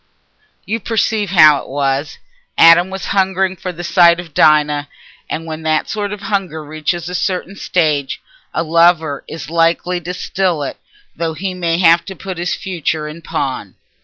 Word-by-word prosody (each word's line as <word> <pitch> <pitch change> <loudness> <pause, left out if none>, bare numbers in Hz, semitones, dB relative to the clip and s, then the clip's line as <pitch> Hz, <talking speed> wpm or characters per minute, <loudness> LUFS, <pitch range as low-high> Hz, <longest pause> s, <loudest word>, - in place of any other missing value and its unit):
You 225 +3 -2
perceive 220 -2 -1
how 155 -5 +6
it - - -13
was: 140 +1 -1 0.4
Adam 170 +2 +7
was 190 0 -6
hungering 190 -1 +1
for 180 0 -5
the 175 0 -8
sight 170 -1 +5
of 170 -4 -9
Dinah, 150 -1 +3 0.4
and 165 - -4
when 160 0 -6
that 155 -1 0
sort 205 -2 -3
of 210 -1 -6
hunger 195 -6 -3
reaches 155 +3 -3
a 180 - -5
certain 185 +1 -2
stage, 155 -8 0 0.3
a - - -1
lover 165 -3 +2
is 160 -2 -8
likely 170 +2 +1
to 180 +2 -5
still 180 -5 -1
it - - -5 0.4
though 165 -1 -3
he 185 +4 -3
may 170 -2 -1
have 170 -1 +5
to 190 - -8
put 185 0 -7
his 175 +1 -1
future 160 -4 -3
in 155 +2 -9
pawn. 130 - -4
170 Hz, 170 wpm, -17 LUFS, 155-185 Hz, 0.4 s, Adam